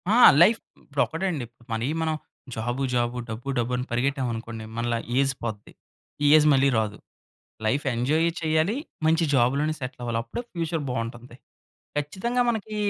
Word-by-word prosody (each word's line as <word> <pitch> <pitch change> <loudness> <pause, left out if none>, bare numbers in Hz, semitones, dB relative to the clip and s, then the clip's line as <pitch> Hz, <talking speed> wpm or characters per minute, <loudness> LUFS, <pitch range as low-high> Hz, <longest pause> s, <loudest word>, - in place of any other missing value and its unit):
ఆ! - - +5 0.2
లైఫ్ 220 +6 +6 0.2
ఇప్పుడు 140 -1 -1
ఒకటండి. 160 -5 -2 0.3
మనయి 115 +6 -1
మనం 160 -1 0 0.4
జాబు 120 +4 -2
జాబు, 120 0 0
డబ్బు 115 +5 -5
డబ్బు 120 +1 0
అని 125 - -2
పరిగెట్టాం 130 +2 0
అనుకోండి. 115 -1 -6
మనలా 120 0 0 0.2
ఏజ్ 135 0 +2
పోద్ది. 110 -3 -5 0.5
ఈ - - +6
ఏజ్ 155 -1 +6
మళ్ళీ 135 0 +4
రాదు. 105 -1 -1 0.7
లైఫ్ 135 +7 +1
ఎంజాయ్ 150 +8 +2
చేయాలి. 160 +6 +1 0.3
మంచి 165 +1 +3
జాబ్‌లోనే 140 +5 +2
సెట్‌లవ్వాలి. 120 -3 -3
అప్పుడే 115 - -5
ఫ్యూచర్ 165 -2 -2
బావుంటుంది. 120 0 -5 0.6
ఖచ్చితంగా 195 - 0
మనకి 215 -1 -4
135 Hz, 145 wpm, -25 LUFS, 120-160 Hz, 0.7 s, లైఫ్